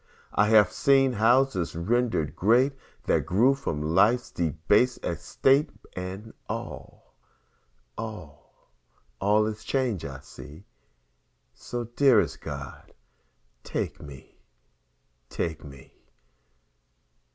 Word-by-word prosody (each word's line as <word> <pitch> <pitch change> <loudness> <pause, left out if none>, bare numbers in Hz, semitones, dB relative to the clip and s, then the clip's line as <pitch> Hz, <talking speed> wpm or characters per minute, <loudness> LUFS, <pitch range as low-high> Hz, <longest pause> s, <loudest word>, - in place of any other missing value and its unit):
I 105 - +3
have 105 -3 +5
seen 135 -2 +3
houses 115 -5 +2
rendered 105 - 0
great 125 +8 +3 0.3
That - - +1
grew 115 +9 +4
from 80 - -3
life's 115 +7 +3
debased 85 - +1
estate, 135 - +1 0.3
And 95 +4 -7 0.2
all, - - -8 0.9
all, 100 - -10 0.5
all 105 +2 +3
is 110 0 -5
change 125 - -1
I 65 -2 -7
see, 75 +7 -13 0.9
So, 120 - -5
dearest 120 +2 +2
God, - - -8 0.7
take - - -4
me, 70 -2 -13 0.9
take 80 -3 -4
me. 70 -2 -13
105 Hz, 95 wpm, -26 LUFS, 85-125 Hz, 0.9 s, have